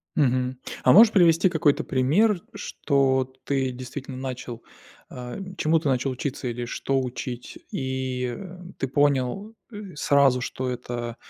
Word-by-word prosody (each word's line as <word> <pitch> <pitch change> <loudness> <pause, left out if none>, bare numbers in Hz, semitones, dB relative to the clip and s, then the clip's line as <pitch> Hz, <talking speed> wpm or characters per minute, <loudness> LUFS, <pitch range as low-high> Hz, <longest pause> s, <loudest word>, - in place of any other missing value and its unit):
Мгм. 130 -3 +1 0.3
А 125 - +6
можешь 220 - +8
привести 170 -2 +5
какой-то 160 -4 +2
пример, 170 - +2
что 130 -2 0
ты, 135 -2 0
действительно, 130 +1 -7
начал, 125 -2 -6 0.5
э, 125 +6 -7 0.2
чему 160 +1 +3
ты 150 - -3
начал 130 0 +1
учиться 130 0 -4
или 120 0 -3
что 135 +2 -1
учить, 125 -1 -6
и 130 -2 -3 0.4
ты 135 - -2
понял, 145 - 0 0.2
э, 205 -5 -9
сразу, 140 -3 +3
что 130 +1 -3
это 120 -1 -5
130 Hz, 135 wpm, -25 LUFS, 125-145 Hz, 0.5 s, можешь